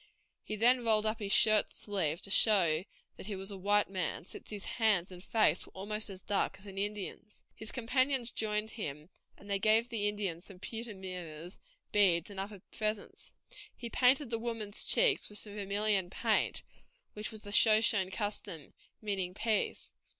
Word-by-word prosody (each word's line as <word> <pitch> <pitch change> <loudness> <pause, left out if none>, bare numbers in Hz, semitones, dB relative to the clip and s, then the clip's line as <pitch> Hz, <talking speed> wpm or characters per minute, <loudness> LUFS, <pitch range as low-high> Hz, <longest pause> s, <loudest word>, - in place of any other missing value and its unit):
He 215 - -5
then 245 +3 +4
rolled 220 -2 +3
up 215 +1 0
his 200 -2 -3
shirt 215 0 +5
sleeve 175 -6 -2
to 195 - -1
show 185 -6 +4 0.3
that - - -8
he 210 - -3
was 195 +1 -3
a - - -5
white 205 +2 +3
man, 185 -3 -3
since - - -10
his 210 -2 -6
hands 205 -6 +2
and 180 0 -10
face 220 +1 +2
were - - -18
almost 210 +3 -3
as 190 -1 -8
dark 195 -1 0
as 195 - -16
an 195 -1 -6
Indian's. 210 +1 -4
His 220 - -4
companions 255 0 0
joined 215 0 -1
him, 150 -7 -6 0.3
and 200 - -15
they 200 -1 0
gave 220 +4 +3
the 210 -3 0
Indians 195 -4 -3
some 195 - -12
pewter 225 +3 -5
mirrors, 180 -3 -7 0.3
beads, 185 -3 +3
and 195 - -7
other 200 0 -6
presents. 215 -1 -4 0.4
He 235 -2 -7
painted 260 0 +3
the 230 - -1
women's 225 -3 -2
cheeks 485 -5 +4
with 210 - -3
some 205 0 -1
vermilion 200 -2 +1
paint, - - 0 0.5
which 210 0 -3
was 220 -1 -9
the 205 - -8
Shoshone 210 -3 +5
custom, 190 - -4 0.3
meaning 190 -3 -2
peace. 220 0 -1
205 Hz, 175 wpm, -32 LUFS, 190-220 Hz, 0.5 s, shirt